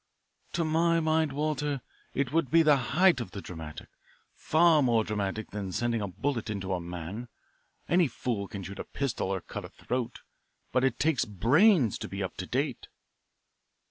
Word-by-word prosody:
"To 170 - +1
my 165 +1 +3
mind, 160 -1 +2
Walter, 150 -1 -1 0.4
it 140 0 0
would 165 -5 +2
be 165 +4 +5
the 150 -2 +6 0.2
height 180 -8 +5
of 120 - -5
the 100 - -7
dramatic 80 -5 -8 0.5
far 160 -1 +4
more 120 -4 +3
dramatic 105 0 -3
than 100 -2 -4
sending 120 +3 0
a 100 - -2
bullet 120 +4 -2
into 95 -2 -2
a 90 - -1
man. 90 +7 -6 0.6
Any 175 -2 +4
fool 115 -5 -3
can 100 -1 -7
shoot 95 +1 -8
a - - -2
pistol 135 -8 -2
or 95 -2 -1
cut - - -7
a - - -8
throat, 125 -2 -4 0.5
but 130 +1 +2
it 135 - +2
takes 155 -3 +2
brains 125 - +4
to - - -5
be - - -4
up - - -4
to - - -5
date." - - -2
125 Hz, 175 wpm, -29 LUFS, 100-155 Hz, 0.6 s, the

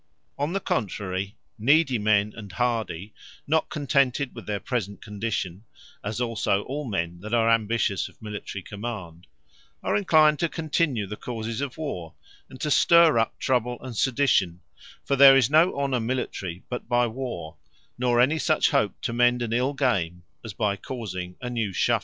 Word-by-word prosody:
On 145 +4 -2
the 195 - 0
contrary, 100 - -2 0.2
needy 135 +1 +3
men, 105 0 +2
and 105 -4 -9
hardy, 110 -5 -2 0.3
not 160 +2 +1
contented 140 -2 +1
with 115 - -10
their 105 -1 -2
present 100 -5 -3
condition; 105 -3 -4 0.4
as 105 +2 -3
also, 115 -4 0
all 145 +3 -4
men 85 -6 -3
that 110 +5 -2
are 115 0 +3
ambitious 110 -3 +1
of - - -23
Military 105 -2 -6
command, 100 -6 -7 0.6
are - - 0
enclined 155 -6 +4
to 170 - +1
continue 155 -8 0
the 105 +2 -7
causes 115 0 -4
of 140 -3 -4
warre; 90 - -5 0.3
and 130 - -12
to 150 - -1
stirre 170 -4 +6
up 115 - -3
trouble 125 -1 0
and 130 -3 -7
sedition: 110 -9 +2 0.4
for 140 - +1
there 135 0 +9
is 135 0 +3
no 160 +3 +4
honour 135 -3 0
Military 110 -7 -3
but 125 - -6
by 120 0 +3
warre; 110 -10 -5 0.4
nor 120 -1 +1
any 145 +6 +3
such - - +2
hope - - +1
to 115 - -2
mend 120 0 +3
an 115 -1 -2
ill 125 +4 +1
game, 90 -10 0 0.2
as 110 - -6
by 105 -1 0
causing 95 -6 -6
a 125 - -4
new 115 -4 -2
shuffle. - - +2
115 Hz, 170 wpm, -25 LUFS, 100-135 Hz, 0.6 s, there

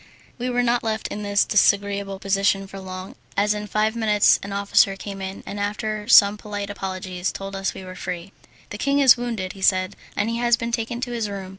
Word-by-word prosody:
We 250 +1 -2
were 245 0 +1
not 240 0 +2
left 220 -1 -2
in 210 - -5
this 205 -1 +2
disagreeable 200 -2 +2
position 195 0 +1
for 195 0 -9
long, 185 0 -8 0.2
as 205 +1 +3
in 210 0 -5
five 215 +2 0
minutes 215 -3 +4
an 200 - -7
officer 200 0 +3
came 195 0 -7
in, 190 0 -6
and 205 - -6
after 210 +1 -3
some 200 -1 +7
polite 205 -1 -5
apologies 185 -2 -4
told 195 0 -7
us 195 0 -2
we - - -8
were 185 0 -8
free. 180 0 -6 0.4
"The 205 - -6
king 280 +3 +1
is 270 -3 +7
wounded," 230 -6 -4
he 195 - -13
said, 185 0 +2 0.2
"and 205 - 0
he 230 0 -1
has 240 0 +3
been 235 0 -3
taken 235 +1 -2
to 250 -1 -3
his 230 -3 -2
room. 195 -2 -6
205 Hz, 220 wpm, -23 LUFS, 195-220 Hz, 0.4 s, some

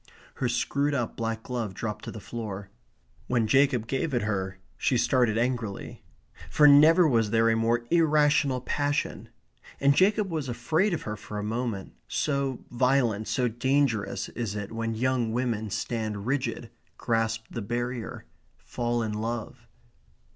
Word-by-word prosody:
Her 125 - 0
screwed 140 +4 0
up 120 -4 -2
black 115 -1 -3
glove 115 -6 -4
dropped 105 0 -4
to - - -5
the 110 - -8
floor. 100 -3 -6 0.6
When 120 -3 +2
Jacob 135 0 +3
gave 135 +4 -1
it 120 - +1
her, 95 -3 -2 0.2
she 125 - +1
started 120 -3 +2
angrily. 115 -4 -2 0.5
For 150 - +6
never 155 +4 +7
was 115 -6 +2
there 115 +1 +3
a - - +2
more 115 +1 +1
irrational 150 -5 +3
passion. 145 +3 -2 0.5
And 140 0 +4
Jacob 200 +4 +3
was 155 -5 -2
afraid 160 - +1
of - - -6
her 105 - -4
for 105 0 -8
a 105 - -3
moment 110 - -3
so 140 -3 -1
violent, 120 -4 +1
so 125 -2 +1
dangerous 120 -2 0
is 115 -4 -4
it 105 -1 -5
when 115 0 -2
young 120 -1 0
women 115 -3 -1
stand 110 -1 -3
rigid; 135 +2 -2 0.3
grasp 115 -1 0
the 115 - -4
barrier; 120 +2 -4 0.3
fall 120 -1 -2
in 110 -1 -2
love. 115 +1 -4
120 Hz, 150 wpm, -27 LUFS, 110-135 Hz, 0.6 s, never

